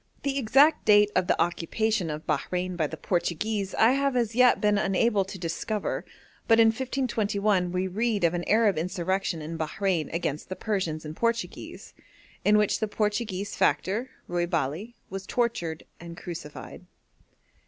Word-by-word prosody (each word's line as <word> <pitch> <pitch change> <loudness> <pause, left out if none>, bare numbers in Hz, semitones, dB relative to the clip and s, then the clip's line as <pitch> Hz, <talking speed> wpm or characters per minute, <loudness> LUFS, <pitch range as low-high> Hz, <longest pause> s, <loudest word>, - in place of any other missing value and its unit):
The 280 -1 0
exact 270 +6 +4
date 210 -1 +6
of 185 -1 +2
the - - +1
occupation 175 +3 0
of 155 +1 -5
Bahrein 180 +4 -1
by 160 -3 0
the - - -8
Portuguese 195 +3 -1
I 225 +2 +5
have 275 0 +1
as 235 -3 +1
yet 250 +1 +5
been 210 -1 +2
unable 200 +1 +2
to 190 +1 -8
discover; 185 +5 -3 0.4
but 225 0 +5
in 225 -1 +7
1521 215 -6 0
we 185 +1 -1
read 210 +1 -1
of 170 0 +3
an 175 0 -2
Arab 215 -6 +3
insurrection 180 -1 -2
in 165 +1 -6
Bahrein 170 +1 -1
against 160 -2 -3
the 185 - -4
Persians 185 -8 -2
and 155 +1 -6
Portuguese, 230 +2 -3 0.5
in 210 0 +5
which 210 -1 +2
the 220 - 0
Portuguese 210 -2 -2
factor, 225 +7 +1 0.2
Ruy 175 0 -1
Bale, 165 +4 -1 0.2
was 195 0 -6
tortured 175 -10 -1 0.2
and 170 0 -9
crucified. 165 -5 -8
195 Hz, 155 wpm, -27 LUFS, 175-220 Hz, 0.5 s, in